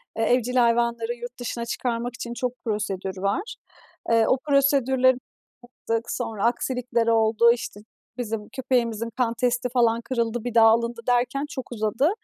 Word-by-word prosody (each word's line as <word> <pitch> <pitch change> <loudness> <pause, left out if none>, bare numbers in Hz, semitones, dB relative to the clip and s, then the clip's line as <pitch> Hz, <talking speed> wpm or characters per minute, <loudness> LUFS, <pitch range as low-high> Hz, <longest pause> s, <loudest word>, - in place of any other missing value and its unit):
e 225 - 0
evcil 250 +1 +1
hayvanları 235 -1 +2
yurt 240 +1 -9
dışına 235 -1 -4
çıkarmak 235 0 -3
için 235 0 -6
çok 250 0 -2
prosedür 195 -3 -3
var. 200 - -2 0.5
Eee, 230 -1 +4
o 260 - +3
prosedürleri 265 -2 +3 0.5
yaptık, 235 -1 -4
sonra 225 -4 -2
aksilikler 240 -1 0
oldu, 225 +1 +4
işte, 230 -3 -4 0.4
bizim 220 -3 -4
köpeğimizin 235 -4 -1
kan 235 -2 +1
testi, 250 +1 0
falan, 235 -2 +2
kırıldı, 235 -2 -2
bir 245 -2 -4
daha 225 -1 +7
alındı 235 +1 +2
derken 245 +3 +1
çok 265 -7 -7
uzadı. 230 - +1
235 Hz, 145 wpm, -24 LUFS, 230-250 Hz, 0.5 s, daha